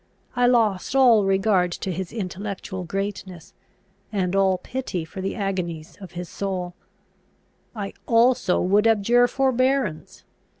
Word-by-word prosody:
I 245 0 +3
lost 225 -2 +1
all 240 -6 +5
regard 195 -2 +2
to 190 - -4
his 180 0 -4
intellectual 195 -2 -5
greatness, 190 -1 -5 0.6
and 190 -3 -1
all 190 -1 +3
pity 215 -8 -4
for 190 +4 -8
the 195 - -3
agonies 180 -6 -4
of 190 -2 -10
his 175 0 -6
soul. 185 -2 -4 1.0
I 200 -2 -5
also 235 -4 +3
would 205 +4 +3
abjure 230 +3 +4
forbearance. 260 - 0
195 Hz, 125 wpm, -23 LUFS, 185-230 Hz, 1.0 s, all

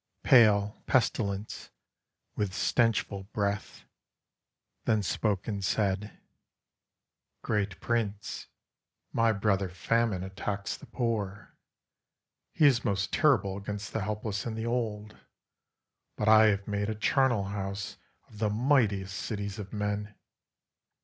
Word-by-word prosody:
Pale 105 -4 +5
Pestilence, 105 -4 0 0.7
with 100 -3 -2
stenchful 100 -1 0
breath, 100 -1 -2 1.0
then 110 -2 +2
spoke 100 +2 -1
and 100 -3 -3
said, 100 +1 -1 1.3
"Great 105 -4 -1
Prince, 105 -3 -2 0.7
my 115 -1 +3
brother, 100 -2 +1
Famine, 105 +1 0
attacks 100 +1 -4
the - - -13
poor. 105 -5 -3 1.0
He 155 - +3
is 125 -4 +5
most 100 -1 -1
terrible 115 -11 +3
against 100 0 -6
the 110 - -1
helpless 105 0 -3
and 110 -1 -4
the 110 - -3
old. 110 -3 -3 1.0
But 105 - -1
I 110 0 +8
have 100 -2 0
made 105 0 -1
a 110 - -2
charnel 120 -1 +2
house 100 0 -4 0.3
of 105 - -14
the 105 -1 +1
mightiest 105 -5 +2
cities 100 -1 -4
of 100 -2 -7
men. 105 0 -3
105 Hz, 115 wpm, -29 LUFS, 100-110 Hz, 1.3 s, I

